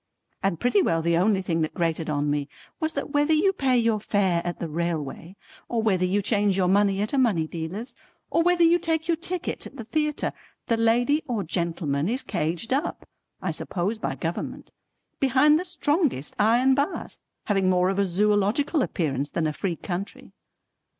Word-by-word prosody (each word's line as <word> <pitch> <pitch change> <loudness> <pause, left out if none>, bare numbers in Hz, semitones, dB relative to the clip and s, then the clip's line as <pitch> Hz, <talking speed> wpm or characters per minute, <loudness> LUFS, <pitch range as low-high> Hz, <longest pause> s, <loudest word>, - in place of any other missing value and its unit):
And 195 -4 0
pretty 240 -5 +3
well 165 -1 +1
the 170 0 +2
only 190 +2 +2
thing 165 -3 -1
that 155 - -2
grated 165 -2 -1
on 145 -1 0
me 145 -1 -2 0.3
was 315 -1 -1
that - - -4
whether 290 +2 +2
you 380 +6 +3
pay 265 -8 +2
your 230 -2 +2
fare 190 -5 +1
at 175 0 -3
the 170 - -4
railway 165 +1 -4 0.3
or 230 -2 0
whether 190 -4 +2
you 200 +3 0
change 205 -2 +2
your 185 -2 +2
money 200 +1 +3
at 215 - -4
a 275 - +2
money 205 -11 +2
dealer's 180 +10 -6 0.4
or - - +3
whether 350 0 +3
you 335 +1 +5
take 325 -1 -1
your 340 - +3
ticket 360 +1 -4
at - - -15
the 230 - -6
theatre, 300 +5 -1 0.3
the 230 - +1
lady 240 +6 +2
or 230 -6 -1
gentleman 165 -3 -1
is 255 +4 0
caged 175 +6 -2
up 275 - -2 0.4
(I - - 0
suppose 200 +5 -2
by - - -2
government) 165 0 -5 0.5
behind 280 +3 +4
the - - -3
strongest 295 - 0
iron 240 +5 +4
bars 285 +7 -2 0.2
having 195 -3 +2
more 180 0 +3
of 195 - -2
a 200 - +3
Zoological 210 - +1
appearance 145 - -1
than 165 - -1
a 155 - 0
free 175 +2 -2
country. 180 +4 -6
205 Hz, 185 wpm, -25 LUFS, 170-265 Hz, 0.5 s, you